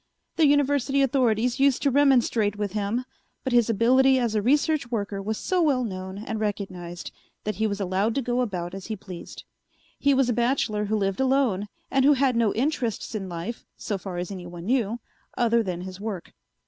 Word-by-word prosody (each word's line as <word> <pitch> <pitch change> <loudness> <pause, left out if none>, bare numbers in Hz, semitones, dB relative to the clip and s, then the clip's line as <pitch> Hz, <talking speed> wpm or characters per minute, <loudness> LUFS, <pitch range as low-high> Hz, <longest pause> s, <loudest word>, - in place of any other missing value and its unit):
The 320 -3 +4
University 280 -1 +2
authorities 245 -3 +1
used 275 -1 +3
to 280 - +3
remonstrate 245 -6 +3
with 205 -2 -2
him, 215 +4 -1 0.4
but 260 - -2
his 240 -1 +4
ability 260 +5 +4
as 240 -3 0
a 215 - +1
research 285 +2 +2
worker 205 -4 -2
was 215 +2 -3
so 370 -1 0
well 275 -6 +2
known 190 -3 -5
and 220 +1 -4
recognized 185 -5 -4 0.3
that 210 -3 -3
he 220 +1 +1
was 200 -1 -3
allowed 195 +3 0
to 275 - +1
go 245 +1 0
about 180 -7 -3
as 195 -1 -7
he 220 - -3
pleased. 185 -3 -10 0.6
He 280 -1 +3
was 265 -2 +3
a 245 - +1
bachelor 235 -3 0
who 215 +1 0
lived 195 -2 -1
alone 260 -7 +2 0.2
and 270 -1 +3
who 290 +2 +6
had 265 -2 +2
no 230 -3 +3
interests 245 -3 -1
in 195 -4 -4
life, 175 +7 -5
so 205 -3 -3
far 180 -1 -6
as 175 +2 -4
anyone 175 -2 -8
knew, 235 -1 0 0.4
other 235 -1 +3
than 180 -5 -3
his 185 +1 -8
work. 205 -5 -5
225 Hz, 195 wpm, -25 LUFS, 195-260 Hz, 0.6 s, who